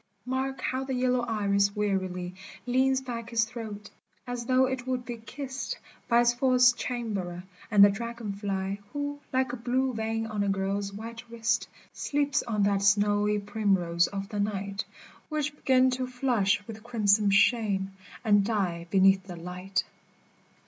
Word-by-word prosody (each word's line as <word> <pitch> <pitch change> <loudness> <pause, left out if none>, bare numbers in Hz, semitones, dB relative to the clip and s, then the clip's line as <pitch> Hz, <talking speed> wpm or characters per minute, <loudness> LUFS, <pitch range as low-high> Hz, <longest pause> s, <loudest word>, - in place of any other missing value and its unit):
Mark 260 +1 -2
how 260 +1 -1
the 265 -1 -3
yellow 250 0 +2
iris 200 -3 +1
wearily 185 -3 -1 0.3
Leans 260 +1 +2
back 235 -3 -6
its 230 -1 +3
throat, 220 -3 -7 0.3
as 245 -1 -5
though 260 0 +4
it 260 -1 -3
would 250 -1 -2
be 240 -1 -5
kissed 260 +4 -5 0.3
By 235 0 +5
its 240 0 +4
false 250 0 +5
chamberer, 200 -9 -4 0.3
the 205 -3 +8
dragon 235 0 -5
fly, 195 -1 -3
Who, 285 0 -3
like 260 -1 +1
a - - -3
blue 255 +2 0
vein 225 0 -2
on 215 -2 -3
a 200 - +1
girl's 195 +1 -1
white 230 +3 -7
wrist, 230 0 0 0.3
Sleeps 285 -1 0
on 215 -4 -1
that 200 -1 +2
snowy 205 +1 +3
primrose 195 -5 +1
of 195 -1 -5
the 205 - -4
night, 200 -1 -2 0.4
Which 300 -1 -1
'gins 255 -1 +4
to 255 -1 -2
flush 230 -5 +1
with 220 -1 -9
crimson 210 -3 +3
shame, 200 -1 +3 0.3
and 205 -2 +5
die 185 -6 -1
be 195 - +2
neath 190 0 +5
the 180 - -7
light. 180 +2 -3
220 Hz, 155 wpm, -28 LUFS, 200-250 Hz, 0.4 s, the